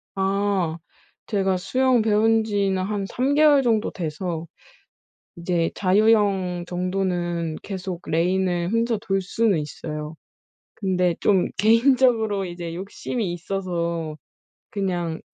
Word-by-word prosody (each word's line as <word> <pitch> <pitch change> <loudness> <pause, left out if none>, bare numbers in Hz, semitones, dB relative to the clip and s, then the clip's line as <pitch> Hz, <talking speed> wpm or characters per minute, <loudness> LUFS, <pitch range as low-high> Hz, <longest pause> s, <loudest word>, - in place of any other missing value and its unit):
아 195 -3 0 0.5
제가 195 -3 0
수영 255 +5 +2
배운 220 +1 +3
지는 200 -3 0
한 200 0 -2
3 260 +5 0
개월 295 -2 +5
정도 225 -3 +1
돼서 165 -1 -4 0.9
이제 170 -1 0
자유형 195 -3 +2
정도는 175 -3 -2
계속 185 -3 -5
레인을 175 +1 +1
혼자 230 +1 +1
돌 195 -3 -1
수는 200 0 +1
있어요. 150 0 -6 0.6
근데 180 -3 0
좀 190 -3 +3
개인적으로 225 -2 +3
이제 175 -1 -6
욕심이 195 +2 -4
있어서 170 -3 -3 0.5
그냥 175 -5 -2
190 Hz, 215 characters per minute, -23 LUFS, 175-215 Hz, 0.9 s, 개월